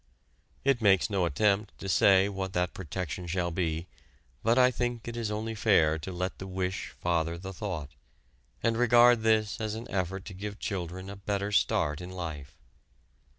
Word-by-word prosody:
It 135 Hz, -3 st, +3 dB
makes 100 Hz, 0 st, +4 dB
no 95 Hz, -3 st, +2 dB
attempt 100 Hz, +5 st, +1 dB
to 95 Hz, -, -7 dB
say 95 Hz, 0 st, +5 dB
what 95 Hz, -2 st, -4 dB
that 90 Hz, -1 st, 0 dB
protection 90 Hz, 0 st, -5 dB
shall 85 Hz, 0 st, -1 dB
be, 80 Hz, -1 st, -1 dB, 0.6 s
but 115 Hz, +2 st, +2 dB
I 125 Hz, 0 st, +6 dB
think 120 Hz, -2 st, -3 dB
it 120 Hz, -, -5 dB
is 115 Hz, -2 st, -2 dB
only 110 Hz, +2 st, -3 dB
fair 85 Hz, -8 st, +3 dB
to 85 Hz, +5 st, -6 dB
let 90 Hz, +1 st, -3 dB
the 95 Hz, -, -6 dB
wish 95 Hz, 0 st, -3 dB
father 85 Hz, -1 st, 0 dB
the 95 Hz, +2 st, -7 dB
thought, 90 Hz, -9 st, -5 dB, 0.7 s
and 115 Hz, -1 st, +2 dB
regard 120 Hz, 0 st, +6 dB
this 110 Hz, -2 st, +2 dB
as 110 Hz, 0 st, -2 dB
an 115 Hz, +1 st, -6 dB
effort 95 Hz, +1 st, -2 dB
to 95 Hz, -, -8 dB
give 100 Hz, +2 st, -6 dB
children 95 Hz, -2 st, -4 dB
a 100 Hz, -, -7 dB
better 100 Hz, +1 st, -2 dB
start 75 Hz, -5 st, +1 dB
in 90 Hz, -, -7 dB
life. 80 Hz, -5 st, -7 dB
95 Hz, 175 wpm, -29 LUFS, 90-110 Hz, 0.7 s, I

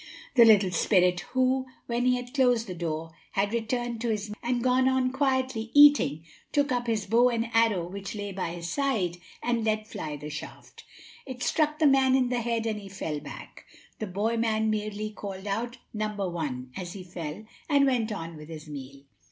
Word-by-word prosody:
The 240 Hz, -3 st, +8 dB
little 205 Hz, -4 st, +6 dB
spirit, 180 Hz, 0 st, +3 dB
who, 260 Hz, 0 st, +2 dB, 0.2 s
when 240 Hz, +1 st, -1 dB
he 250 Hz, -, +4 dB
had 245 Hz, 0 st, -6 dB
closed 245 Hz, -4 st, +3 dB
the 185 Hz, -, -5 dB
door, 165 Hz, -1 st, -4 dB, 0.2 s
had 200 Hz, +2 st, 0 dB
returned 235 Hz, 0 st, -2 dB
to 235 Hz, -, -1 dB
his 210 Hz, -1 st, -2 dB
meal 210 Hz, -, -7 dB
and 240 Hz, 0 st, -1 dB
gone 255 Hz, +1 st, +4 dB
on 260 Hz, -1 st, +1 dB
quietly 260 Hz, -4 st, 0 dB
eating, 290 Hz, -, +6 dB, 0.3 s
took 285 Hz, -1 st, +2 dB
up 245 Hz, -1 st, 0 dB
his 220 Hz, -3 st, 0 dB
bow 235 Hz, +4 st, +4 dB
and 230 Hz, -1 st, -2 dB
arrow 225 Hz, -7 st, +3 dB
which 195 Hz, +3 st, -6 dB
lay 205 Hz, -1 st, -4 dB
by 185 Hz, -3 st, -3 dB
his 170 Hz, 0 st, -6 dB
side, 210 Hz, -8 st, 0 dB, 0.3 s
and 240 Hz, -1 st, 0 dB
let 215 Hz, -1 st, 0 dB
fly 155 Hz, -8 st, -5 dB
the 150 Hz, +1 st, -7 dB
shaft. 150 Hz, -, -9 dB, 0.4 s
It 255 Hz, -1 st, -5 dB
struck 305 Hz, -1 st, +1 dB
the 315 Hz, -, +2 dB
man 270 Hz, -2 st, +5 dB
in 255 Hz, -2 st, +2 dB
the 245 Hz, -1 st, 0 dB
head, 230 Hz, -1 st, -1 dB
and 215 Hz, -2 st, -1 dB
he 200 Hz, -1 st, -10 dB
fell 160 Hz, -6 st, -4 dB
back. 145 Hz, -, -10 dB, 0.3 s
The 215 Hz, -, -3 dB
boy 210 Hz, +5 st, -1 dB
man 220 Hz, -1 st, +1 dB
merely 215 Hz, 0 st, -3 dB
called 195 Hz, -2 st, -7 dB
out, 235 Hz, +5 st, -2 dB, 0.2 s
"Number 210 Hz, -2 st, -2 dB
one," 135 Hz, -8 st, -4 dB
as 180 Hz, -2 st, -5 dB
he 195 Hz, -, -8 dB
fell, 170 Hz, +2 st, -7 dB, 0.2 s
and 285 Hz, -2 st, +5 dB
went 240 Hz, -5 st, +1 dB
on 165 Hz, -5 st, -5 dB
with 150 Hz, +1 st, -11 dB
his 155 Hz, -1 st, -8 dB
meal. 140 Hz, -1 st, -9 dB
220 Hz, 200 wpm, -28 LUFS, 185-245 Hz, 0.4 s, The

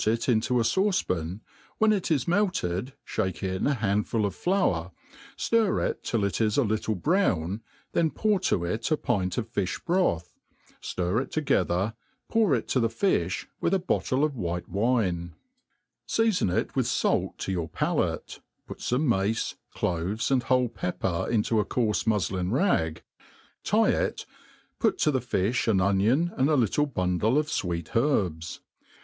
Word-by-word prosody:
iUntp 110 Hz, 0 st, +1 dB
a -, -, +2 dB
fauce 190 Hz, -, +2 dB
pan, 90 Hz, +3 st, -2 dB, 0.4 s
when 220 Hz, 0 st, +4 dB
it 195 Hz, -4 st, -1 dB
i$ 155 Hz, -, +5 dB
melted 140 Hz, -, 0 dB
fliake 95 Hz, 0 st, -2 dB
in 95 Hz, -1 st, -1 dB
a 140 Hz, -, +2 dB
handful 105 Hz, 0 st, 0 dB
of 100 Hz, -, -2 dB
flour, 95 Hz, -, 0 dB, 0.5 s
ftir 225 Hz, -4 st, +2 dB
it -, -, -5 dB
till 115 Hz, -4 st, 0 dB
it 100 Hz, +2 st, -1 dB
is 110 Hz, -1 st, +1 dB
a 140 Hz, -, +4 dB
little 110 Hz, 0 st, -1 dB
brown, 100 Hz, -, +1 dB, 0.3 s
then 165 Hz, -2 st, +2 dB
poiur 210 Hz, +2 st, +1 dB
to 95 Hz, -, +1 dB
it 110 Hz, +6 st, -2 dB
a 155 Hz, -, +2 dB
pint 95 Hz, -10 st, -1 dB
of 115 Hz, -, -1 dB
fifh 95 Hz, -2 st, -2 dB
broth, 170 Hz, -, +1 dB, 0.5 s
fiir 90 Hz, +6 st, -1 dB
it -, -, -6 dB
together, 105 Hz, -, +1 dB, 0.3 s
pour 215 Hz, -10 st, +3 dB
it 115 Hz, -, -3 dB
to 130 Hz, -, +1 dB
the 115 Hz, -, +3 dB
fi(k, 110 Hz, -, 0 dB, 0.2 s
whh -, -, +1 dB
a -, -, +5 dB
hottle 130 Hz, +3 st, +1 dB
of 155 Hz, -, +2 dB
white^wine,' 90 Hz, -2 st, -1 dB, 0.7 s
Seafon 220 Hz, -, +2 dB
it -, -, -1 dB
with -, -, +1 dB
fait -, -, 0 dB
to -, -, -3 dB
your 85 Hz, -3 st, -2 dB
palace^ -, -, -1 dB, 0.3 s
put -, -, -9 dB
fome 125 Hz, +5 st, 0 dB
mace, 110 Hz, -3 st, 0 dB, 0.2 s
cloves, 90 Hz, +8 st, -1 dB
and 130 Hz, -2 st, +3 dB
wbole 125 Hz, -2 st, +2 dB
pepper 90 Hz, -2 st, -2 dB
into 110 Hz, 0 st, +2 dB
a -, -, +3 dB
coarfe 105 Hz, -2 st, 0 dB
qnufi'in 95 Hz, -4 st, 0 dB
rag, 80 Hz, -, +1 dB, 0.6 s
tie -, -, +3 dB
it, -, -, -1 dB, 0.5 s
put -, -, +2 dB
to 150 Hz, -, +2 dB
the 130 Hz, -, +1 dB
fiQx 120 Hz, +1 st, 0 dB
an 105 Hz, -4 st, +3 dB
onion, 105 Hz, -, +2 dB
and 135 Hz, +3 st, +3 dB
a 155 Hz, -, +4 dB
little 135 Hz, +4 st, +2 dB
bundle 100 Hz, +1 st, +1 dB
of 150 Hz, -, +2 dB
/weet 85 Hz, -, -3 dB
herbs. 95 Hz, -, 0 dB
110 Hz, 160 wpm, -27 LUFS, 90-140 Hz, 0.7 s, i$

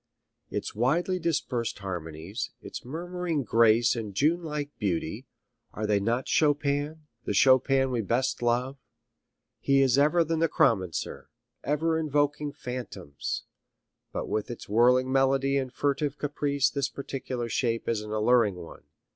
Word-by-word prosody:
Its -, -, -4 dB
widely 170 Hz, -, +1 dB
dispersed 140 Hz, -8 st, -1 dB
harmonies, 90 Hz, +2 st, -5 dB
its -, -, -8 dB
murmuring 170 Hz, +2 st, -3 dB
grace 115 Hz, +1 st, +4 dB
and 105 Hz, -4 st, -5 dB
June 160 Hz, -, +2 dB
like 150 Hz, -3 st, -5 dB
beauty, 100 Hz, +4 st, -2 dB, 0.5 s
are 110 Hz, -, -3 dB
they 105 Hz, -1 st, +2 dB
not 115 Hz, +5 st, -1 dB
Chopin, 145 Hz, +1 st, +1 dB, 0.2 s
the 105 Hz, -, -1 dB
Chopin 135 Hz, +3 st, +4 dB
we 120 Hz, -2 st, 0 dB
best 120 Hz, +6 st, 0 dB
love? 125 Hz, +3 st, 0 dB, 0.8 s
He 135 Hz, 0 st, +3 dB
is 135 Hz, 0 st, +3 dB
ever 155 Hz, +4 st, +4 dB
the 165 Hz, 0 st, -1 dB
necromancer, 110 Hz, -, 0 dB, 0.3 s
ever 160 Hz, +3 st, +1 dB
invoking 145 Hz, -1 st, 0 dB
phantoms, 125 Hz, -, -5 dB, 0.7 s
but -, -, -4 dB
with 110 Hz, -, -2 dB
its 120 Hz, -, -7 dB
whirring 125 Hz, +4 st, +4 dB
melody 135 Hz, +1 st, +2 dB
and 130 Hz, -2 st, -2 dB
furtive 145 Hz, +1 st, -1 dB
caprice 145 Hz, -1 st, 0 dB
this 140 Hz, -1 st, -1 dB
particular 130 Hz, -3 st, -5 dB
shape 115 Hz, 0 st, -1 dB
is 115 Hz, -2 st, 0 dB
an 105 Hz, -, -8 dB
alluring 110 Hz, -1 st, +3 dB
one. 85 Hz, -2 st, -11 dB
130 Hz, 135 wpm, -27 LUFS, 115-145 Hz, 0.8 s, grace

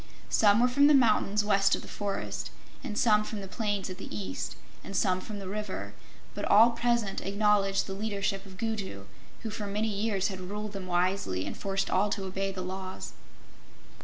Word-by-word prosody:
Some 205 Hz, 0 st, +5 dB
were 245 Hz, -, +5 dB
from 280 Hz, +3 st, +5 dB
the 295 Hz, -, +7 dB
mountains 210 Hz, -4 st, +3 dB
west 195 Hz, -1 st, +4 dB
of -, -, -7 dB
the -, -, -10 dB
forest, 200 Hz, -1 st, -3 dB, 0.3 s
and 215 Hz, -6 st, -4 dB
some 210 Hz, -2 st, +4 dB
from 210 Hz, 0 st, -5 dB
the 195 Hz, -, -6 dB
plains 205 Hz, -1 st, -2 dB
at 185 Hz, 0 st, -7 dB
the -, -, -7 dB
east, 95 Hz, -3 st, -4 dB, 0.3 s
and 195 Hz, -, -7 dB
some 185 Hz, 0 st, +2 dB
from 210 Hz, +1 st, -6 dB
the 195 Hz, -2 st, -6 dB
river; 190 Hz, -, -4 dB, 0.4 s
but -, -, -5 dB
all 225 Hz, +3 st, +7 dB
present 235 Hz, -3 st, 0 dB
acknowledged 200 Hz, -1 st, +2 dB
the 195 Hz, -, -5 dB
leadership 200 Hz, -1 st, -2 dB
of 190 Hz, -1 st, -12 dB
Gugu, 200 Hz, -, -3 dB, 0.4 s
who 225 Hz, -, -3 dB
for 210 Hz, 0 st, -4 dB
many 210 Hz, +2 st, 0 dB
years 200 Hz, -1 st, 0 dB
had 190 Hz, -2 st, -6 dB
ruled 205 Hz, +3 st, -5 dB
them 195 Hz, -2 st, -6 dB
wisely 175 Hz, -, 0 dB
and -, -, -4 dB
forced 195 Hz, 0 st, -2 dB
all 195 Hz, +3 st, +3 dB
to 200 Hz, -, -2 dB
obey 195 Hz, +1 st, -2 dB
the 185 Hz, -1 st, -5 dB
laws. 185 Hz, 0 st, -6 dB
200 Hz, 190 wpm, -29 LUFS, 190-215 Hz, 0.4 s, the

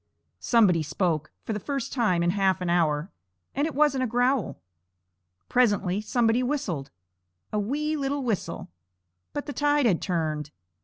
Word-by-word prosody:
Somebody 200 Hz, -9 st, +4 dB
spoke, 155 Hz, -1 st, -1 dB
for 225 Hz, -, -3 dB
the 210 Hz, -, -2 dB
first 275 Hz, +3 st, -3 dB
time 200 Hz, -9 st, +2 dB
in 175 Hz, -, +3 dB
half 190 Hz, -1 st, +2 dB
an 180 Hz, -2 st, -1 dB
hour, 160 Hz, -1 st, +1 dB, 0.4 s
and 285 Hz, +3 st, 0 dB
it 320 Hz, -, -6 dB
wasn't 290 Hz, -3 st, +3 dB
a -, -, +1 dB
growl. 245 Hz, -1 st, +1 dB, 0.9 s
Presently 205 Hz, -5 st, +2 dB
somebody 230 Hz, +2 st, +2 dB
whistled 200 Hz, -, -2 dB, 0.6 s
a 210 Hz, -, +1 dB
wee 295 Hz, +9 st, -1 dB
little 280 Hz, -1 st, -1 dB
whistle; 220 Hz, -, -3 dB, 0.6 s
but 290 Hz, -, -4 dB
the 290 Hz, -, -5 dB
tide 290 Hz, -1 st, +2 dB
had 190 Hz, -8 st, +2 dB
turned. 155 Hz, -5 st, -2 dB
215 Hz, 150 wpm, -26 LUFS, 175-270 Hz, 0.9 s, Somebody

